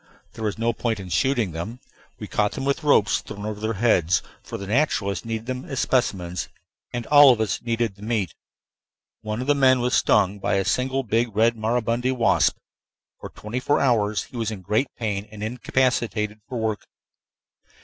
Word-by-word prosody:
There 110 Hz, -, -7 dB
was 105 Hz, 0 st, -2 dB
no 115 Hz, +1 st, +1 dB
point 115 Hz, -2 st, -2 dB
in 95 Hz, -1 st, -8 dB
shooting 120 Hz, -2 st, +1 dB
them; 100 Hz, +10 st, -6 dB, 0.4 s
we -, -, -7 dB
caught 105 Hz, -1 st, 0 dB
them 135 Hz, -, -4 dB
with 140 Hz, +3 st, 0 dB
ropes 125 Hz, -9 st, +3 dB
thrown 100 Hz, +1 st, -8 dB
over 105 Hz, -1 st, -4 dB
their 110 Hz, +1 st, -1 dB
heads; 95 Hz, -6 st, +2 dB, 0.2 s
for -, -, -7 dB
the 100 Hz, -, -7 dB
naturalists 100 Hz, -, 0 dB
needed 115 Hz, -1 st, -4 dB
them 130 Hz, 0 st, -4 dB
as 135 Hz, -7 st, -4 dB
specimens, 90 Hz, -8 st, 0 dB, 0.4 s
and 120 Hz, -1 st, -4 dB
all 145 Hz, -1 st, +8 dB
of 120 Hz, -, +1 dB
us 110 Hz, -2 st, -1 dB
needed 115 Hz, -2 st, -1 dB
the 100 Hz, -, -19 dB
meat. 105 Hz, -6 st, -1 dB, 0.9 s
One 105 Hz, +2 st, -3 dB
of -, -, -3 dB
the 145 Hz, -, +4 dB
men 130 Hz, -2 st, +4 dB
was 125 Hz, +1 st, 0 dB
stung 100 Hz, -1 st, +3 dB
by 100 Hz, -, 0 dB
a 95 Hz, -1 st, +1 dB
single 130 Hz, +5 st, 0 dB
big 115 Hz, -1 st, 0 dB
red 115 Hz, +2 st, +3 dB
maribundi 115 Hz, +2 st, 0 dB
wasp. 120 Hz, -2 st, +2 dB, 0.6 s
For -, -, -8 dB
twenty 110 Hz, +4 st, -5 dB
four 145 Hz, +3 st, +1 dB
hours 110 Hz, -5 st, +2 dB
he 125 Hz, -, -11 dB
was 115 Hz, -2 st, -1 dB
in 105 Hz, -4 st, -6 dB
great 110 Hz, +8 st, +1 dB
pain 105 Hz, -3 st, -3 dB
and 105 Hz, -1 st, -8 dB
incapacitated 115 Hz, -2 st, -1 dB
for 125 Hz, -, -4 dB
work. 110 Hz, -2 st, -2 dB
115 Hz, 190 wpm, -24 LUFS, 105-125 Hz, 0.9 s, all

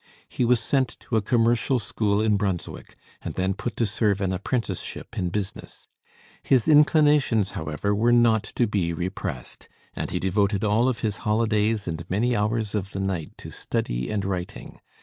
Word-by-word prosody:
He 125 Hz, -, -1 dB
was 120 Hz, 0 st, +4 dB
sent 130 Hz, +2 st, -1 dB
to 120 Hz, -, -4 dB
a 110 Hz, -, +3 dB
commercial 120 Hz, +3 st, +2 dB
school 105 Hz, -1 st, 0 dB
in 110 Hz, -1 st, +3 dB
Brunswick, 100 Hz, -4 st, -3 dB, 0.3 s
and -, -, -6 dB
then 95 Hz, +1 st, 0 dB
put 110 Hz, +2 st, -5 dB
to 115 Hz, -, +2 dB
serve 105 Hz, -1 st, +1 dB
an 95 Hz, -1 st, 0 dB
apprenticeship 100 Hz, 0 st, -4 dB
in 90 Hz, -, -1 dB
business. 95 Hz, +1 st, -6 dB, 0.5 s
His 130 Hz, -4 st, +2 dB
inclinations, 150 Hz, -, +4 dB
however, 80 Hz, +6 st, -2 dB
were 115 Hz, +4 st, +2 dB
not 120 Hz, -2 st, +4 dB
to 120 Hz, -, +3 dB
be 95 Hz, -6 st, -1 dB
repressed; 90 Hz, -5 st, -5 dB, 0.2 s
and -, -, -4 dB
he -, -, -2 dB
devoted 100 Hz, +1 st, +1 dB
all 110 Hz, +4 st, +3 dB
of 125 Hz, -, -3 dB
his 105 Hz, -2 st, -1 dB
holidays 110 Hz, -1 st, +1 dB
and 85 Hz, -1 st, -3 dB
many 120 Hz, +6 st, +1 dB
hours 105 Hz, 0 st, -1 dB
of 100 Hz, -2 st, -3 dB
the 95 Hz, -, -4 dB
night 95 Hz, -5 st, -3 dB
to -, -, -9 dB
study -, -, -2 dB
and 100 Hz, -2 st, -2 dB
writing. 90 Hz, -2 st, -5 dB
105 Hz, 170 wpm, -25 LUFS, 95-115 Hz, 0.5 s, was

